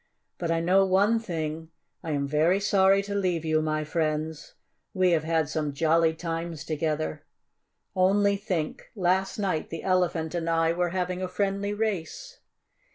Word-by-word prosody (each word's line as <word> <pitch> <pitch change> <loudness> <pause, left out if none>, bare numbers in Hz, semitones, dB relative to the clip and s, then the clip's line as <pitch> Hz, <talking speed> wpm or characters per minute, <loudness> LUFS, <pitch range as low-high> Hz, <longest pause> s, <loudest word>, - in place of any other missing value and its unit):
"But 170 - -2
I 165 0 +1
know 185 +3 +4
one 200 +4 +3
thing: 160 -6 -4 0.3
I 165 - -5
am 140 -2 -1
very 160 +6 +2
sorry 195 -1 +3
to 200 0 -5
leave 180 -5 0
you, 155 0 +2
my 155 0 -1
friends. 155 0 -2 0.4
We 185 -1 +3
have 160 -2 +2
had 160 -1 +1
some 150 -1 -2
jolly 160 +2 +2
times 165 -1 -4
together. 155 0 -2 0.7
Only 200 +2 +3
think 185 -6 -3
last 190 0 +1
night 190 -7 -1
the 165 - -6
Elephant 180 -4 0
and 170 -1 -2
I 165 0 +2
were 175 0 0
having 180 0 -2
a 185 - -1
friendly 200 +2 -1
race!" 220 - -3
170 Hz, 160 wpm, -27 LUFS, 160-195 Hz, 0.7 s, know